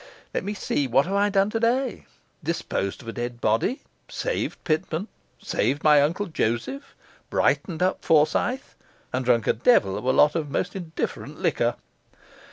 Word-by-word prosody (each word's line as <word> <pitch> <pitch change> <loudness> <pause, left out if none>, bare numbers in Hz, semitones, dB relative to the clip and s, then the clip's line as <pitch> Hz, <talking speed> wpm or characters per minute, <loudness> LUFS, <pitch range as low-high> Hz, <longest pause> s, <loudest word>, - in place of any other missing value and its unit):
Let - - -1
me 205 +2 -3
see; 145 -7 -1
what 135 +3 +3
have 190 - -3
I 200 +1 +3
done 200 +1 +2
today? 235 +3 0 0.4
Disposed 100 +5 -2
of - - -14
a 115 - -4
dead 120 0 -4
body, 115 - +1 0.3
saved - - -2
Pitman, 160 +4 -1 0.3
saved 135 +7 -1
my 150 -2 +6
Uncle 170 +8 0
Joseph, 155 - -2 0.3
brightened 175 -2 +1
up 185 - 0
Forsyth, 165 - +2 0.4
and 130 +1 0
drunk 120 -2 +2
a - - +3
devil 110 - +3
of - - -5
a 130 - +4
lot 150 +3 +5
of 155 -3 -2
most 180 +7 -2
indifferent 170 -4 -5
liquor. - - +1
155 Hz, 160 wpm, -25 LUFS, 125-200 Hz, 0.4 s, my